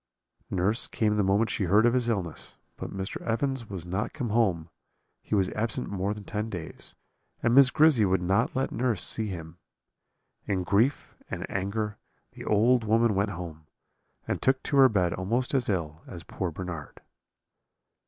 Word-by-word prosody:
"Nurse 95 +5 0
came 105 -2 0
the 105 - +2
moment 100 +4 +2
she 100 - -1
heard 105 +6 +4
of 120 - +4
his 125 -2 +1
illness; 90 -8 -4 0.2
but - - -6
Mr. 95 0 -5
Evans 120 0 -1
was 95 -4 -5
not 95 +4 -3
come 125 -7 -3
home, 95 -8 +1 0.5
he - - -2
was 95 -2 +1
absent 110 +1 -2
more 100 +1 -1
than 105 - -9
ten 105 +2 -3
days, 90 -6 -8 0.5
and 120 0 +3
Miss 135 0 +8
Grizzy 150 -5 +5
would 95 -2 +2
not 100 +8 +1
let 135 +1 0
nurse 115 -8 0
see 110 -1 0
him. 85 -3 -7 0.9
In 95 -2 0
grief 105 +9 +1
and - - -4
anger 105 +2 -2 0.3
the - - -10
old 115 +3 +3
woman 110 +1 +3
went 100 +1 +1
home, 85 -5 -8 0.6
and - - -2
took 130 0 +2
to 140 - 0
her 135 -1 +8
bed 90 -6 +1
almost 115 +9 -1
as 130 -5 +1
ill 80 -5 -2
as 85 -2 -9
poor 95 - -4
Bernard. 85 -3 -7
105 Hz, 175 wpm, -27 LUFS, 90-115 Hz, 0.9 s, Miss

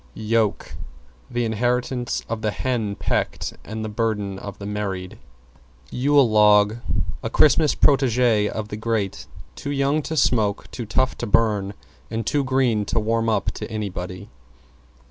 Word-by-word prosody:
=YOKE= 110 -1 0 0.6
The 120 0 -1
inheritance 120 +2 -1
of 115 -1 -4
the 110 - 0
hen 110 -3 -2
pecked - - -2
and 110 0 -5
the - - -3
burden 105 -3 -2
of 100 -1 -8
the 100 - -8
married. 100 -3 -4 0.7
=YULE 140 +1 +4
LOG= 105 0 +5 0.4
A - - -3
Christmas 155 0 +4
protege 125 -6 +3
of 110 -1 -5
the 105 - -5
grate, 110 -3 -2 0.3
too 140 - -6
young 140 +2 +1
to 160 +2 -4
smoke, 110 -7 +1
too 120 -4 -6
tough 130 +6 +1
to 120 - -3
burn 105 -2 +2 0.3
and 115 -1 -3
too 145 +4 +1
green 130 -5 +1
to 115 - 0
warm 115 +1 0
up 110 - 0
to - - -7
anybody. 100 -3 -5
110 Hz, 145 wpm, -23 LUFS, 105-125 Hz, 0.7 s, LOG=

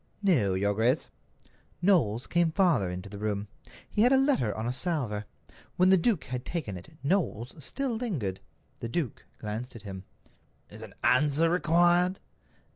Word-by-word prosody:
"No, 125 - +3
your 100 +2 +1
grace." 120 +7 +1 0.7
Knowles 140 - +2
came 170 -1 +2
farther 165 - +2
into 90 +2 -6
the 100 0 -9
room. 105 -1 -2 0.4
He 210 - 0
had 245 +3 +5
a 270 - +6
letter 265 - +2
on 110 - -3
a 120 - -1
salver. 130 - -1 0.5
When 185 +1 +5
the - - +8
duke 190 0 +1
had 125 -1 -5
taken 145 - -4
it, 150 - -12
Knowles 140 - 0
still 260 - -2
lingered. 140 - -3 0.4
The 115 - -5
duke 135 -3 -3
glanced 110 +4 -5
at 110 - -10
him. 95 -2 -8 0.7
"Is - - -11
an - - -10
answer 150 +5 +3
required?" 175 +2 +3
140 Hz, 160 wpm, -29 LUFS, 105-180 Hz, 0.7 s, the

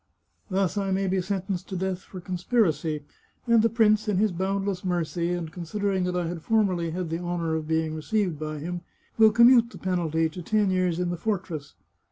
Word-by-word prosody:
Thus 195 0 0
I 195 -1 -1
may 195 +1 +1
be 190 0 +1
sentenced 190 -1 -3
to 190 - -4
death 190 0 -2
for 185 - -10
conspir 185 +6 +1
acy, 150 -1 -2 0.4
and 235 -2 +5
the 230 - +3
prince, 215 -1 +3
in 205 -3 +1
his 210 +1 +3
boundless 195 +1 -2
mercy, 170 -2 -1
and 175 -3 -3
consider 200 +4 -2
ing 190 -2 0
that 180 0 -2
I 180 -1 0
had 165 0 -4
formerly 185 -5 +1
had 170 0 -4
the 165 - -1
honour 175 -2 -2
of 160 -1 -2
being 160 0 0
received 175 0 -1
by 155 0 -4
him, 175 +4 -4 0.4
will 220 -1 +8
commute 235 +1 +6
the - - -11
penalty 165 -3 0
to 160 +3 -8
ten 210 +2 +1
years 180 -2 +1
in 180 -1 0
the 175 - -3
fortress. 180 -8 -3
180 Hz, 210 wpm, -26 LUFS, 165-200 Hz, 0.4 s, will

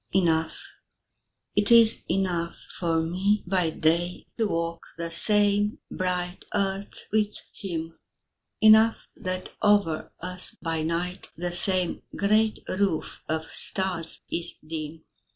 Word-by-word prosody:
Enough 165 -3 +2 1.0
It 205 0 +2
is 230 -1 +6
enough 175 -3 0 0.2
for 165 -2 +1
me 190 +5 +1
by 180 -2 +1
day 170 +3 0
To 220 - +3
walk 165 -2 -2 0.2
the 170 0 -4
same 205 +2 +3
bright 180 -1 -2
earth 195 0 -2
with 210 -1 +1 0.2
him; 165 -4 -5 0.6
Enough 220 +1 +7 0.2
that 185 0 -4
over 205 -7 +2
us 180 +1 0
by 165 -2 -1
night 170 +3 -3
The 175 +1 -3
same 180 0 +3
great 215 +2 +2
roof 185 -4 -1
of 160 0 -1
stars 185 -4 -3
is 170 - -3
dim. 160 0 -6
180 Hz, 115 wpm, -26 LUFS, 165-200 Hz, 1.0 s, Enough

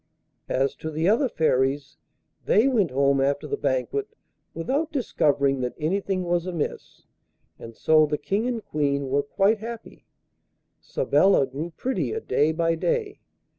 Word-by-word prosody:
As 135 +1 +1
to 160 - -5
the 160 +2 -1
other 240 +6 +3
Fairies, 140 - 0 0.5
they 220 +6 +4
went 220 -10 +2
home 140 +1 +2
after 140 +1 0
the - - -2
banquet 425 -2 -1 0.5
without 280 - -1
discovering 140 - +1
that 125 -1 -3
anything 185 +3 -1
was 175 0 -1
amiss, 170 -5 -5 0.6
and 115 0 -10
so 155 +3 +4
the 150 0 -1
King 210 +9 -1
and 235 -3 -3
Queen 140 -2 -1
were 140 +2 +2
quite 195 +9 +1
happy. 230 +1 -9 0.7
Sabella 190 -8 +2
grew 150 +6 -6
prettier 265 - -2
day 155 - +1
by 165 +1 +1
day. 425 - -2
165 Hz, 140 wpm, -25 LUFS, 140-225 Hz, 0.7 s, they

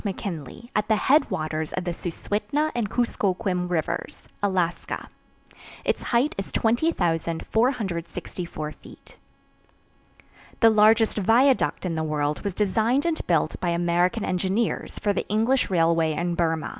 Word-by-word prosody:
McKinley, 195 - -6
at 210 0 +1
the 220 - +3
headwaters 160 - +1
of 185 - -2
the 175 - -2
Suswhitna 215 - -2
and 235 -4 -1
Kuskokwim 190 -6 0
rivers, 165 -4 -3
Alaska. 185 -4 -1 0.8
Its - - 0
height 245 +5 +1
is 195 - -5
20,464 175 - -1
feet. - - -16 1.4
The 225 -1 +6
largest 220 +1 +4
viaduct 245 +3 +3
in 175 - -1
the 160 - -1
world 150 -1 -1
was 200 -3 -3
designed 220 - +1
and 335 -2 -1
built 160 -3 +1
by 175 - -1
American 175 +5 +1
engineers 190 +5 -1
for 205 - 0
the - - -3
English 225 +6 +1
railway 165 -3 +2
in 175 +3 -1
Burma. 165 -2 0
190 Hz, 125 wpm, -25 LUFS, 170-225 Hz, 1.4 s, The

